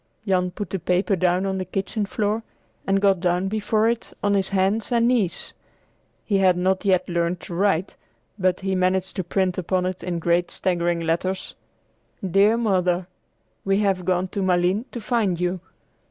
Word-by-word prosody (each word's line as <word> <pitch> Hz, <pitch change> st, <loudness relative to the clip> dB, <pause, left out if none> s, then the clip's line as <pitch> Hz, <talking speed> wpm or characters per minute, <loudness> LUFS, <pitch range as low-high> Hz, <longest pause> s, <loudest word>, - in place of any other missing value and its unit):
Jan 180 Hz, -1 st, +2 dB
put 200 Hz, +3 st, -6 dB
the 195 Hz, -, -2 dB
paper 180 Hz, +4 st, +1 dB
down 180 Hz, +1 st, +1 dB
on 190 Hz, -1 st, -1 dB
the -, -, -1 dB
kitchen 195 Hz, +3 st, -2 dB
floor 210 Hz, +2 st, -1 dB, 0.5 s
and 195 Hz, 0 st, +3 dB
got 195 Hz, -2 st, +3 dB
down 180 Hz, +1 st, +1 dB
before 215 Hz, +1 st, +1 dB
it 235 Hz, 0 st, -2 dB
on 205 Hz, 0 st, +2 dB
his 195 Hz, -1 st, +1 dB
hands 195 Hz, +4 st, 0 dB
and 235 Hz, -1 st, +3 dB
knees. 230 Hz, -8 st, 0 dB, 0.7 s
He 200 Hz, -3 st, +1 dB
had 185 Hz, -2 st, +4 dB
not 185 Hz, +1 st, +1 dB
yet 190 Hz, -3 st, +2 dB
learned 170 Hz, 0 st, -1 dB
to -, -, -8 dB
write, 190 Hz, 0 st, +1 dB, 0.4 s
but 185 Hz, 0 st, +1 dB
he 190 Hz, 0 st, -1 dB
managed 185 Hz, 0 st, 0 dB
to 185 Hz, -, 0 dB
print 185 Hz, +1 st, 0 dB
upon 185 Hz, +1 st, 0 dB
it 185 Hz, 0 st, -4 dB
in 175 Hz, -1 st, -2 dB
great 170 Hz, +1 st, +1 dB
staggering 175 Hz, -2 st, -1 dB
letters: 170 Hz, +3 st, -2 dB, 0.7 s
"DEAR 200 Hz, +5 st, +4 dB
MOTHER 185 Hz, -5 st, +1 dB, 0.6 s
WE 195 Hz, 0 st, +2 dB
HAVE 195 Hz, -3 st, +1 dB
GONE 185 Hz, 0 st, 0 dB
TO 200 Hz, -, -3 dB
MALINES 185 Hz, +4 st, +1 dB
TO 240 Hz, -, -5 dB
FIND 210 Hz, -6 st, 0 dB
YOU. 180 Hz, +1 st, -1 dB
190 Hz, 175 wpm, -23 LUFS, 180-200 Hz, 0.7 s, had